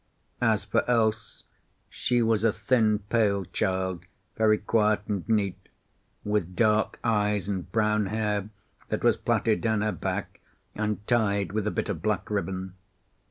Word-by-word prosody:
As - - +2
for - - +1
Else, 110 -3 0 0.4
she 120 -1 0
was 110 -2 +2
a 115 - +4
thin, 105 -1 +1
pale 100 -4 +2
child, 95 0 -2 0.3
very 110 -1 +4
quiet 105 0 +2
and 100 -1 -3
neat, 100 -4 0 0.5
with 105 -4 -1
dark 110 0 +2
eyes 105 -3 +1
and 95 -3 -4
brown 105 -1 +1
hair 105 -1 -1 0.4
that - - -2
was - - +4
plaited 110 -2 +1
down 110 -2 +1
her 105 0 +1
back - - -4 0.3
and 105 -1 -2
tied 100 -5 +1
with 105 0 -1
a - - +3
bit - - -2
of 90 -6 -3
black 105 -1 -1
ribbon. 95 -2 -3
105 Hz, 150 wpm, -27 LUFS, 100-110 Hz, 0.5 s, a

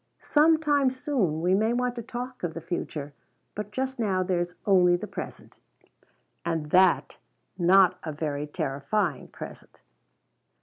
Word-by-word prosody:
Some 315 +2 +4
time 290 -4 +2
soon 250 - -1
we 180 +2 +2
may 220 +4 +2
want 250 0 0
to 240 - -5
talk 250 +3 -6
of 165 -3 -3
the - - -3
future, 155 -4 -5 0.4
but 210 0 -5
just 265 +2 -3
now 190 -5 +1
there's 175 -1 -1
only 180 -3 +5
the 175 - -4
present. - - -8 0.9
And 160 -3 -3 0.9
not 185 +1 +5
a 155 - -5
very 150 -1 -3
terrifying 145 +5 -2
present. - - -11
185 Hz, 135 wpm, -27 LUFS, 165-245 Hz, 0.9 s, only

